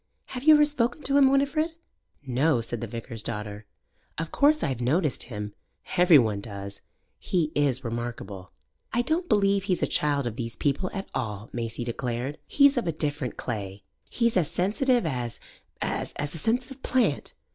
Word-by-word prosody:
Have 250 +1 -5
you 310 -1 +9
ever 300 0 +6
spoken 290 0 0
to 275 - +1
him, 270 -1 +7
Winifred?" 285 +4 +2 0.5
"No," 130 +2 +2
said 115 0 -4
the 115 - -3
vicar's 115 0 -7
daughter. 105 -1 -5 0.5
"Of 165 +1 -3
course 300 +2 +4
I've 130 -5 -1
noticed 150 +3 +1
him. 105 -3 -5 0.4
Every 175 -3 +7
one 110 -6 +2
does 100 -2 -7 0.4
he 165 -5 0
is 140 -3 +1
remarkable." 115 -5 -5 0.4
"I 240 - +1
don't 335 +7 -1
believe 200 -1 +3
he's 185 -3 0
a - - +3
child 145 -2 +1
of 120 -1 -4
these 115 -2 -4
people 145 +6 0
at 195 -1 -5
all," 105 0 -4
Maisie 115 0 -3
declared. 125 +3 -3
"He's 280 -2 +5
of 240 - 0
a - - +2
different 145 -5 -2
clay. 100 -4 -5 0.3
He's 235 -2 +1
as 165 -5 +2
sensitive 235 +5 +1
as 125 -6 -3 0.4
as - - -2
a 145 - 0
sensitive 245 - -2
plant. 235 - +1
145 Hz, 170 wpm, -27 LUFS, -, 0.5 s, you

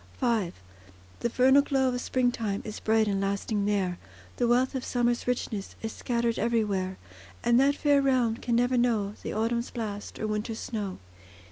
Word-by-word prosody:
V 220 -7 +1 0.7
The 235 - 0
vernal 265 +4 +5
glow 270 -2 +1
of 245 0 -2
springtime 240 -6 0
Is 215 -1 -6
bright 220 0 +2
and 195 -1 0
lasting 200 +1 -1
there, 190 -4 0 0.4
The 240 - +2
wealth 250 +3 +3
of 260 -2 -3
summer's 240 -1 0
richness 225 -5 -2
Is 225 - -2
scattered 235 -1 -1
everywhere; 205 -5 0 0.5
And 240 +1 +4
that 280 +1 +4
fair 290 -1 +3
realm 250 -4 +2
can 235 -1 -1
never 245 +1 +2
know 220 -5 +1
The - - -4
autumn's 235 +2 0
blast 210 -4 -5
or - - -3
winter's 215 +1 -2
snow. 205 -6 -4
235 Hz, 165 wpm, -28 LUFS, 210-245 Hz, 0.7 s, vernal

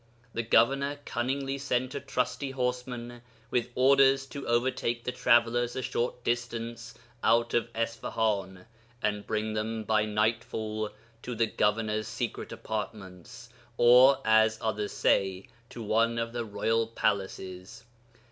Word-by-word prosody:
The 115 - -1
governor 140 +5 +2
cunningly 135 +3 -2
sent 130 -2 -1
a - - -3
trusty 135 +1 -2
horseman 125 -2 -3 0.3
with 125 0 0
orders 135 +1 +5
to 140 -2 -7
overtake 120 0 0
the 125 - -2
travellers 120 0 +2
a 130 - -3
short 120 +1 -2
distance 120 -1 -3 0.3
out 115 0 +3
of 120 0 +1
Isfahan, 110 -4 -2 0.4
and 105 -1 -1
bring 110 0 -1
them 110 +1 -2
by 110 0 +2
nightfall 110 0 -1 0.3
to 125 - -5
the 115 +1 +2
governor's 110 0 0
secret 115 +1 -4
apartments 110 +1 -7 0.3
or 125 +3 +7
(as 110 0 +4
others 105 -2 -2
say) 95 -1 +1 0.2
to 115 - -8
one 115 +2 +2
of 115 0 -2
the 120 -1 -3
royal 115 +2 0
palaces. 95 -3 -3
115 Hz, 130 wpm, -29 LUFS, 110-125 Hz, 0.4 s, or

